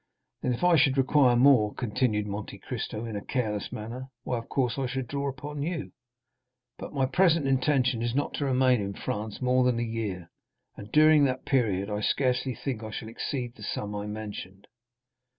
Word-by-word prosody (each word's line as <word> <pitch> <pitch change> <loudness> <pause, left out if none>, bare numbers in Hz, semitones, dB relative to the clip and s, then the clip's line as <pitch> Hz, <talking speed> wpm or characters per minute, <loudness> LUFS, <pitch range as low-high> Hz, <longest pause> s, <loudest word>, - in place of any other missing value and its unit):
"Then, 125 - 0
if 120 - -7
I 175 -2 +6
should 135 -1 +3
require 135 -1 +4
more," 120 -5 +5
continued 110 -2 0
Monte 105 0 -5
Cristo 110 +2 -5
in 110 -2 -5
a 100 - -4
careless 110 -6 -2
manner, 120 +5 -6
"why, 125 - -1
of 115 - -11
course, 130 -1 0
I 135 - 0
should 130 +1 -3
draw 140 +3 -2
upon 145 +2 -6
you; 165 0 -3 0.9
but - - -7
my 135 -2 +1
present 165 +1 +3
intention 130 -2 +2
is 120 +1 -1
not 145 - 0
to 145 - -2
remain 130 -3 +3
in 100 0 -3
France 105 +3 -4
more 125 0 +3
than 125 -2 +2
a 120 - 0
year, 110 -7 -4 0.4
and 105 +1 -10
during 155 -1 +6
that 130 -1 -2
period 105 -8 +1
I 105 0 -3
scarcely 125 +2 +1
think 130 -6 -4
I 110 - -6
shall 110 +1 -6
exceed 120 +1 -4
the 110 - -16
sum 105 0 -4
I 105 0 -4
mentioned. 105 -2 -7
125 Hz, 190 wpm, -28 LUFS, 110-135 Hz, 0.9 s, I